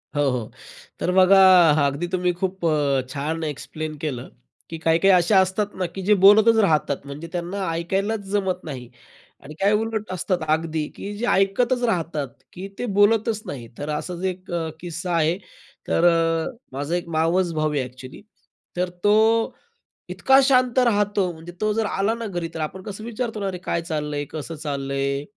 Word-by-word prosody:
हो, 145 -1 +2
हो. 125 -4 -3 0.5
तर 180 - 0
बघा 190 +1 +6 0.5
अगदी 140 +5 -1
तुम्ही 180 0 0
खूप 185 0 -3
अ, 145 -4 +2
छान 150 +4 -3
एक्सप्लेन 155 +1 -5
केलं. 140 -5 -5 0.4
की 165 - -5
काही-काही 165 +4 +3
अशा 180 +2 +4
असतात 190 +2 0
ना, 185 - -2
की 175 +3 -6
जे 210 +3 +4
बोलतच 220 +3 +7
राहतात 150 -6 +1
म्हणजे 140 +4 -8
त्यांना 185 +2 -3
ऐकायलाच 195 +6 -1
जमत 195 -2 -1
नाही. 130 -6 -7 0.5
आणि 150 +2 -10
काही 200 +2 +4
उलट 220 0 -1
असतात 185 +1 -1
अगदी, 160 -1 0
की 205 - -6
जे 240 - -2
ऐकतच 235 +6 +2
राहतात, 165 - -1 0.3
की 190 +2 -7
ते 245 - -2
बोलतच 220 +1 +3
नाही. 120 -5 -7
तर 145 - -5
असाच 170 +4 -4
एक 185 0 -12
अ, 165 -2 -2
किस्सा 175 +1 -5
आहे. 165 +1 +2 0.5
तर 170 - +2
अ, 165 +2 +2 0.2
माझा 145 +5 -2
एक 175 -1 -3
मावस 170 +2 +2
भाऊ 155 -1 0
आहे 140 -3 0
ॲक्चुअली. 130 +1 -11 0.6
तर 180 0 0
तो 220 +2 +3 0.5
इतका 265 0 +4
शांत 255 -2 +3
राहतो 205 -6 +2
म्हणजे 165 +2 -11
तो 215 0 +2
जर 220 +1 0
आला 205 +2 0
ना 230 0 -6
घरी, 175 -4 -3
तर 165 - -6
आपण 170 +5 -4
कसं 205 +2 -7
विचारतो 230 -1 -4
ना, 200 - -2
"अरे 185 - -3
काय 170 - -1
चाललंय, 150 -3 -3
कसं 160 +1 -6
चाललंय?" 140 -2 -2
175 Hz, 175 wpm, -23 LUFS, 155-205 Hz, 0.6 s, बोलतच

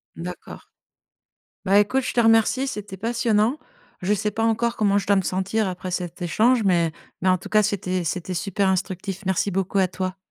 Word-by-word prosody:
D'accord. 175 +2 -9 1.0
Bah, 200 +1 +4
écoute, 255 +6 +2
je - - -3
te 240 - +3
remercie, 225 +3 +3
c'était 210 -6 -6
passionnant. 230 +3 +1 0.4
Je 205 +3 +2
sais 210 +1 -1
pas 225 +2 -2
encore 230 +1 +1
comment 200 -2 +2
je 195 - -4
dois 200 - +4
me 190 - +2
sentir 190 +3 -1
après 185 0 -5
cet 180 0 -4
échange 220 +8 +3
mais 170 -3 +3 0.3
mais 185 - +1
en 185 - +5
tout - - -10
cas, 215 0 +4
c'était 185 -3 -1
c'était 180 +3 -3
super 195 +2 0
instructif. 190 +1 -2
Merci 190 +1 +1
beaucoup 195 +1 -1
à 185 - +3
toi. 185 +1 -4
195 Hz, 190 wpm, -23 LUFS, 185-220 Hz, 1.0 s, en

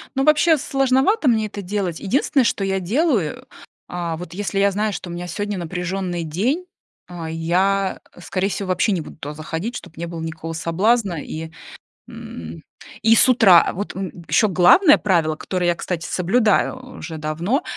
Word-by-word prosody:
Ну, 270 - +1
вообще, 305 +2 +5
сложновато 270 - +1
мне 220 -3 +3
это 205 0 -7
делать. 190 -3 -3
Единственное, 270 - +1
что 210 - 0
я 195 0 0
делаю, 215 - 0 0.4
а, 170 -2 -4
вот 175 0 -9
если 195 +1 -2
я 200 0 +3
знаю, 210 +2 -1
что 175 0 -6
у - - -6
меня 175 +1 -5
сегодня 205 +2 -3
напряженный 180 0 -3
день, 225 - -1 0.4
а, 170 -2 -7
я, 185 +4 0 0.2
скорее 190 +2 -2
всего, 190 0 -4
вообще 185 +4 +2
не 180 -4 0
буду - - -11
туда 150 -1 -6
заходить, 165 +9 -5
чтоб 175 -4 -9
не 170 +1 -4
было 165 -1 -6
никакого 160 0 -5
соблазна, 185 +2 +1
и, 160 +1 -6 0.6
м, 80 0 -9 0.4
и 225 +1 +5
с - - +6
утра. 215 -9 +6
Вот, 205 +3 -5
м, 190 -1 -4 0.2
ещё 215 - +4
главное 195 - +6
правило, 165 -6 +1
которое 180 +3 -3
я, 175 - +2
кстати, 175 0 -4
соблюдаю 210 +6 +1 0.2
уже 160 0 -7
давно- 165 - -1
185 Hz, 170 wpm, -21 LUFS, 170-215 Hz, 0.6 s, с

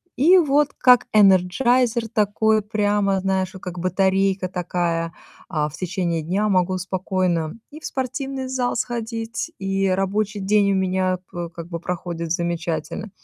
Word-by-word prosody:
и 340 +8 +6
вот, 295 -3 +3
как 250 -2 +5
энерджайзер 225 +5 +3
такой 215 0 +2
прямо, 205 -2 +1
знаешь, 190 -1 -1
как 180 -1 -6
батарейка 190 +1 +1
такая, 170 -2 -2 0.4
а, 150 -4 0
в - - -17
течение 175 -1 -2
дня 190 +7 0
могу 185 -2 +2
спокойно 185 -3 -1 0.2
и 305 - -10
в - - -11
спортивный 265 0 -3
зал 255 -1 -1
сходить, 230 +3 -3
и 195 0 0
рабочий 200 +3 0
день 200 +1 +2
у - - +1
меня 185 -1 +1
п 175 -1 -5
как 170 -1 -9
бы 170 -1 -4
проходит 170 -1 -4
замечательно, 170 +4 -2
195 Hz, 140 wpm, -22 LUFS, 180-220 Hz, 0.4 s, и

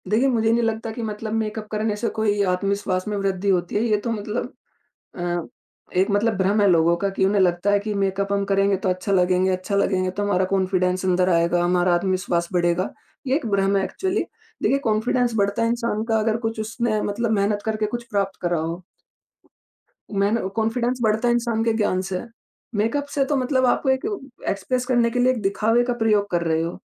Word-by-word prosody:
देखिए, 225 +6 +3
मुझे 225 -3 +2
नहीं 235 +1 +2
लगता 225 0 -2
कि 235 - -6
मतलब 215 0 -4
मेकअप 220 -1 -2
करने 215 0 -1
से 220 +2 -2
कोई 210 -2 0
आत्मविश्वास 190 0 -1
में 210 - -2
वृद्धि 195 0 -1
होती 175 -1 0
है 205 - +2
ये 215 -3 +2
तो 235 - 0
मतलब 215 +1 -4 0.6
अ, 175 -1 -2 0.5
एक 190 +3 +3
मतलब 205 +2 +1
भ्रम 195 +3 +2
है 205 - +4
लोगों 170 0 +4
का 200 +3 -1
कि - - +2
उन्हें 200 +1 +2
लगता 180 +1 +2
है 205 - +4
कि 210 +1 -4
मेकअप 195 0 -1
हम 200 0 +1
करेंगे 195 0 +2
तो - - +2
अच्छा 185 +2 -1
लगेंगे 185 0 +3
अच्छा 185 +2 -2
लगेंगे 185 -2 +1
तो 200 +3 -4
हमारा 190 -2 +1
कॉन्फिडेंस 185 -1 +1
अंदर 185 0 +2
आएगा, 170 0 +2
हमारा 180 0 +2
आत्मविश्वास 180 -1 0
बढ़ेगा। 175 0 +1 0.4
ये 260 - +2
एक 310 - -3
भ्रम 200 -1 +1
है 195 - +1
एक्चुअली। 380 - -2 0.4
देखिए 275 - +3
कॉन्फिडेंस 235 +2 +1
बढ़ता 200 +1 +1
है 230 - +2
इंसान 235 -2 -1
का 225 -1 +2
अगर 220 0 +1
कुछ 225 0 -3
उसने 220 0 -1
मतलब 225 +3 -1
मेहनत 205 +1 0
करके 215 -1 -1
कुछ 240 - -11
प्राप्त 200 -2 -1
करा 175 -1 0
हो। 165 +3 -4 1.4
मैंने 205 0 +1
कॉन्फिडेंस 235 +3 0
बढ़ता 220 +1 +2
है 240 - +4
इंसान 235 -2 0
के 230 -1 +2
ज्ञान 205 -4 +1
से 185 -1 -3
है, 235 - -9 0.5
मेकअप 230 +8 0
से 275 -2 +2
तो 290 - 0
मतलब 260 0 +1
आप 255 - +1
एक 265 +5 +1
उ 415 -1 -2 0.3
एक्सप्रेस 250 +6 -1
करने 240 -2 +2
के 245 - -1
लिए 250 +1 +4
एक 245 -4 -3
दिखावे 215 +4 +2
का 245 0 -1
प्रयोग 215 -3 +1
कर 175 -1 +1
रहे 160 0 +1
हो। 165 +1 -4
205 Hz, 210 wpm, -23 LUFS, 185-225 Hz, 1.4 s, है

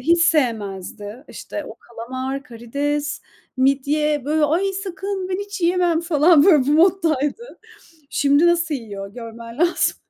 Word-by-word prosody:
hiç 335 +6 +3
sevmezdi. 220 - -1
İşte - - -7
o - - -9
kalamar, 260 +4 -6
karides, 285 +5 -3 0.3
midye, 280 +2 +1
böyle 305 +2 +2
ay 325 +6 +1 0.2
sakın, 385 0 -4
ben 370 - -1
hiç 405 0 -6
yiyemem 345 -1 +2
falan 325 -2 +4
böyle 305 -9 +5
bu 290 - +2
moddaydı. 330 - +1 0.5
Şimdi 285 +3 +3
nasıl 340 -3 +1
yiyor 200 -5 -8
görmen 230 0 -9
lazım. 345 +1 +2
295 Hz, 130 wpm, -21 LUFS, 250-340 Hz, 0.5 s, böyle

